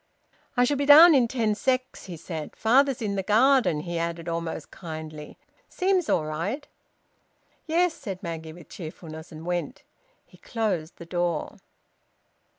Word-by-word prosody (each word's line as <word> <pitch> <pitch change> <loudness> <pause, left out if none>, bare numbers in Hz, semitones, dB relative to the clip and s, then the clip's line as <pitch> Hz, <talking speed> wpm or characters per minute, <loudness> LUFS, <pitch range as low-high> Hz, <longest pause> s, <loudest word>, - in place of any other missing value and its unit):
"I 245 - +5
shall 280 +3 +1
be 280 0 -1
down 315 +4 +10
in 255 -4 +4
ten 225 -3 0
secs," 255 -1 -2
said 160 -2 -6
he. - - -31
"Father's 260 +2 +3
in 205 -2 -1
the - - +1
garden," 225 - +3
he 170 0 -4
added, 170 0 -3
almost 165 -2 -4
kindly. 155 -3 -8 0.3
"Seems 370 -3 0
all 155 - +2
right." 190 - -4 1.0
"Yes," 340 +1 +2
said 200 - -7
Maggie, 165 -2 -6
with 170 -1 -14
cheerfulness, 160 -1 -9
and 160 0 -10
went. 175 0 -3 0.4
He - - -21
closed 195 -9 -3
the 170 - -10
door. 175 -2 -2
185 Hz, 150 wpm, -26 LUFS, 165-260 Hz, 1.0 s, down